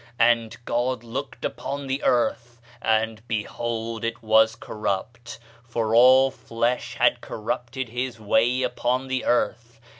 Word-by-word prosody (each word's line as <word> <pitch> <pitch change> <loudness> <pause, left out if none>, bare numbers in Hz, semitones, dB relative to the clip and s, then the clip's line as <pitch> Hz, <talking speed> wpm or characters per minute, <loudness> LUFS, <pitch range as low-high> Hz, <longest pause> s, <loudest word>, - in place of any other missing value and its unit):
And 115 -2 +2
God 120 0 -1
looked 130 +4 -6
upon 140 0 -4
the 135 +1 -2
earth, 120 -1 0 0.2
and, 110 0 +1
behold, 115 +1 -3
it 115 0 -3
was 110 +1 +4
corrupt; 110 +3 -4 0.3
for 115 -2 -2
all 130 +3 +7
flesh 120 +1 -2
had - - +3
corrupted 120 +3 -4
his 125 0 -4
way 120 +4 +2
upon 125 +1 -1
the 130 0 -1
earth. 120 -1 0
120 Hz, 125 wpm, -24 LUFS, 115-125 Hz, 0.3 s, all